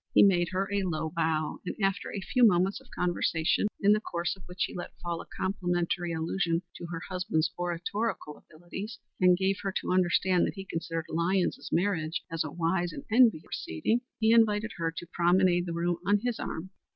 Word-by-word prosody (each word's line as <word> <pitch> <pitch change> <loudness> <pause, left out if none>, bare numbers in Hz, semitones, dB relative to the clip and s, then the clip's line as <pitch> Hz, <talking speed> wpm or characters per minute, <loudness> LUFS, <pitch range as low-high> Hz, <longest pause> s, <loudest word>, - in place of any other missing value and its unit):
He - - +8
made 175 -4 +4
her 190 +1 -1
a 200 - +2
low 160 -3 -2
bow 160 -2 0
and, - - -4
after 195 0 0
a 200 - -4
few 250 +6 +1
moments 195 +1 +4
of 265 - -20
conversation, 175 0 +1
in 200 - +5
the 215 - +2
course 175 -4 -2
of 190 - -18
which 180 0 -2
he - - -3
let 175 -1 -7
fall 170 -1 -3
a - - -13
complimentary 175 -2 -1
allusion 165 +1 0
to 170 - -7
her 165 -1 -5
husband's 170 -4 0
oratorical 175 0 -2
abilities 190 +8 -8 0.2
and 180 -1 +5
gave 190 +1 +1
her 195 - -2
to - - -2
understand 180 0 +3
that - - -5
he 195 -1 -7
considered 165 -2 -3
Lyons's 175 +3 0
marriage 170 -3 0
as 165 -1 0
a 155 - -4
wise 175 +2 0
and - - -7
enviable 225 -8 +5
proceeding, 150 - -1 0.2
he 220 0 +4
invited 220 -1 +3
her 165 -1 -1
to - - -5
promenade 175 +1 +3
the - - -2
room 170 +1 0
on 200 +2 +2
his 245 -2 -1
arm. 180 +4 -5
180 Hz, 195 wpm, -29 LUFS, 170-195 Hz, 0.2 s, He